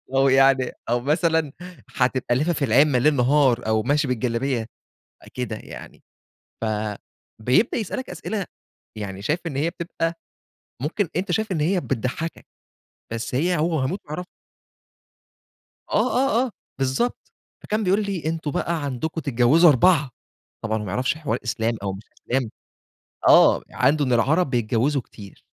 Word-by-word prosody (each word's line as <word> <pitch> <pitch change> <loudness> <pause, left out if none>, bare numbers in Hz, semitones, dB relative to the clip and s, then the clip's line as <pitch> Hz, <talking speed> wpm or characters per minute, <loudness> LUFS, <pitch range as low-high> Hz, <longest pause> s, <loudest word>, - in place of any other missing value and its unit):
أو 135 0 +4
يعني 135 -1 +4 0.2
أو 120 +1 +2
مثلًا 160 +2 +1 0.4
هتبقى 125 -1 +1
لافِف 155 +2 0
العِمَّة 135 +2 +4
ليل 150 +4 +3
نهار 130 -2 +3
أو 110 0 +2
ماشي 145 +3 +1
بالجلابية 125 0 -1 0.7
كده 125 -3 -3
يعني. - - -11 0.6
فبيبدأ 110 - -1
يسألك 230 +3 -4
أسئلة، 180 +3 -4 0.5
يعني 100 -2 -6
شايف 155 - 0
إن 150 -5 -4
هي 155 +4 +1
بتبقى 170 -1 -3 0.7
ممكن 165 +6 -1
أنت 185 +2 -1
شايف 220 +3 -1
إن 175 - 0
هي 180 +5 +2
بتضحكك، 135 +6 -3 0.7
بس 115 +2 -4
هي 170 +6 +1
هو 160 -1 +1
هيموت 135 +10 -2
ويعرفها. 165 +5 -5 1.7
آه، - - +2
آه، 260 -2 +2
آه 250 - -6 0.3
بالضبط. 135 - -1 0.3
فكان 215 +1 -1
بيقول 200 +2 +2
لي: 195 -6 -4
"أنتم 160 -2 -2
بقى 165 +1 -2
عندكم 145 +4 -3
تتجوزوا 140 +6 +5
أربعة"، 150 +1 +4 0.5
طبعًا 110 0 0
هو - - -5
ما 95 - -5
يعرفش 125 +6 0
حوار 155 -3 -2
إسلام 115 0 -1
أو 100 -1 -2
مش 95 +3 -9 0.2
إسلام 125 -2 -1 0.8
آه - - +6
عنده 145 +3 +2
إن 130 - 0
العرب 140 +7 +2
بيتجوزوا 120 +3 +1
كتير، 100 -4 -14
140 Hz, 140 wpm, -23 LUFS, 120-165 Hz, 1.7 s, آه